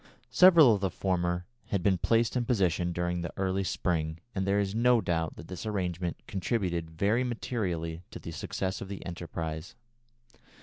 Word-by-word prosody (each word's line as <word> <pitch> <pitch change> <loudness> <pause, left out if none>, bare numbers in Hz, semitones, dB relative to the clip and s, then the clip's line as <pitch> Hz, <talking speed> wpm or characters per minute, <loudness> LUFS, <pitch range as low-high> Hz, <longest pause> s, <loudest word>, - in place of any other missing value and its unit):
Several 170 -9 +8
of 100 - -1
the 95 - +1
former 90 -1 -1 0.2
had 100 -3 -1
been 95 -2 +3
placed 115 +4 +2
in 125 - +2
position 90 - +1
during 85 0 -1
the 85 - -4
early 95 0 0
spring, 80 -4 -1 0.2
and 95 -2 -1
there 100 +1 +3
is 100 -1 -1
no 120 +2 +4
doubt 80 -5 -1
that 80 - -10
this 90 - -6
arrangement 90 -5 -2
contributed 90 -4 -1
very 100 +9 +1
materially 90 -9 -3
to - - -8
the - - -8
success 95 -1 -3
of 100 - -5
the 100 0 -7
enterprise. 80 -2 -5
95 Hz, 170 wpm, -29 LUFS, 85-105 Hz, 0.2 s, Several